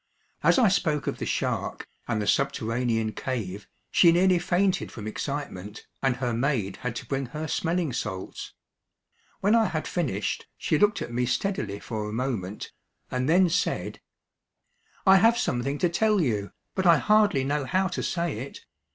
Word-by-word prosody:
As - - +4
I 245 -4 +5
spoke 155 -6 +1
of - - -3
the - - -3
shark, - - -2 0.2
and 110 - 0
the 105 - -1
subterranean 115 -3 0
cave, 105 -6 -4 0.2
she 170 - +6
nearly 180 +1 +4
fainted 180 +2 +1
from 105 - -8
excitement, 110 -4 -5 0.2
and 135 -2 +2
her 125 -2 -2
maid 115 -6 0
had 125 -2 -4
to 130 - -5
bring 135 +1 -2
her 155 +5 -5
smelling 165 -3 -1
salts. 95 -6 -5 0.9
When 205 +3 +3
I 230 -1 +5
had 155 -6 -2
finished, 110 - -2
she 155 - 0
looked 210 +3 +3
at 120 - -7
me 125 +1 0
steadily 120 - -1
for 105 -1 -4
a - - -6
moment, 110 -5 -3 0.4
and 130 +2 -1
then 180 +3 +5
said: 175 +3 -1 1.0
"I 190 0 +8
have 230 +5 +5
something 135 - -1
to 175 - +2
tell 210 +4 +2
you, 105 - 0 0.2
but 190 -1 0
I 170 - +7
hardly 210 -9 +3
know 145 +1 -1
how 185 +8 +1
to 180 - -3
say 170 -9 -2
it. 135 +4 -8
140 Hz, 170 wpm, -26 LUFS, 115-180 Hz, 1.0 s, I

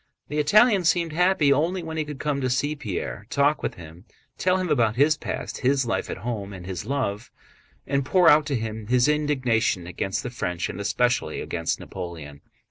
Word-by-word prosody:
The 150 - -2
Italian 205 +6 +5
seemed 170 -1 +1
happy 175 -4 +3
only 170 +6 0
when 160 0 -6
he 155 -1 -1
could 150 -1 -7
come 145 -2 -1
to 130 - 0
see 145 +4 0
Pierre, 90 - -5
talk 145 +2 +2
with - - -3
him, 85 +3 -12 0.3
tell 185 0 +1
him 185 -2 -2
about 115 -7 +2
his 145 +5 +4
past, - - -5
his 135 0 +2
life 115 - -2
at - - -4
home, 105 -5 -4
and 90 -2 -9
his 95 +1 -5
love, 120 -6 -2 0.6
and 140 0 0
pour 180 +6 +3
out 150 0 +6
to 140 - -1
him 110 -2 -4
his 125 +2 +3
indignation 130 - +1
against 90 +2 -3
the 125 - -5
French 90 -8 -3
and 100 - -5
especially 125 +4 0
against 85 -1 -2
Napoleon. 80 -5 -8
130 Hz, 195 wpm, -25 LUFS, 100-150 Hz, 0.6 s, out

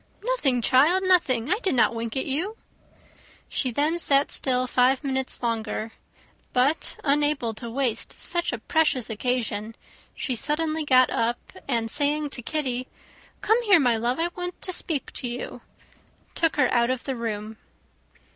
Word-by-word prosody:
"Nothing, 290 - +1
child, 310 +11 +4
nothing. 310 -8 +2
I 435 - -2
did 380 - 0
not 235 - +3
wink 230 +2 -4
at 265 - 0
you." 350 +11 -2 0.9
She 260 - 0
then 300 +7 0
sat 280 -3 +3
still 255 -1 +1
five 255 +2 +2
minutes 265 -2 -3
longer; 225 -1 -2 0.6
but 270 +5 +1
unable 290 -5 +1
to 230 +2 -8
waste 250 -2 -2
such 345 0 -1
a 240 - -3
precious 275 -3 +1
occasion, 225 -2 -2 0.4
she 260 - -2
suddenly 310 +4 -1
got 255 -2 +5
up, 235 +1 0 0.3
and 230 -4 +1
saying 295 0 +1
to 250 - -4
Kitty, 255 -3 -2 0.5
"Come 445 +3 +3
here, 405 -7 +5
my 245 -5 +3
love, 240 +5 -1
I 340 +1 +1
want 355 0 -7
to 370 - 0
speak 315 -5 -2
to 250 - -3
you," 240 +1 -6 0.7
took 330 -1 +1
her 260 -4 +2
out 240 -1 +3
of 255 -1 -2
the 270 - -3
room. 220 -2 -5
265 Hz, 155 wpm, -25 LUFS, 240-310 Hz, 0.9 s, got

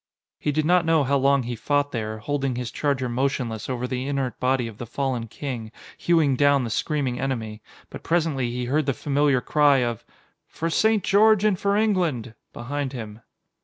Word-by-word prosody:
He 150 - -1
did 155 +1 0
not 180 +1 +4
know 160 -2 +3
how 140 +1 +2
long 140 0 +3
he 120 0 -4
fought 145 +5 0
there, 110 -3 -3
holding 135 +3 -2
his 125 -2 -4
charger 140 -3 -1
motionless 120 -3 -2
over 125 -1 -2
the 130 +1 -3
inert 135 -4 -2
body 130 -1 +1
of 110 -2 -11
the 120 - -6
fallen 125 -1 -2
king, 115 -3 -6 0.2
hewing 160 -6 +2
down 145 0 +3
the 115 - -4
screaming 135 -2 -1
enemy, 115 -5 -3 0.3
but - - -8
presently 155 -7 0
he 125 +1 -3
heard 145 +4 0
the 135 - +1
familiar 140 -2 +1
cry 145 -1 +3
of 120 -2 -3 0.4
"For 165 +1 -4
St. 220 +3 +2
George 215 +1 +4
and 200 -4 +2
for 200 0 +1
England" 175 - 0 0.2
behind 140 +2 -4
him. 110 -3 -7
135 Hz, 185 wpm, -24 LUFS, 120-150 Hz, 0.4 s, not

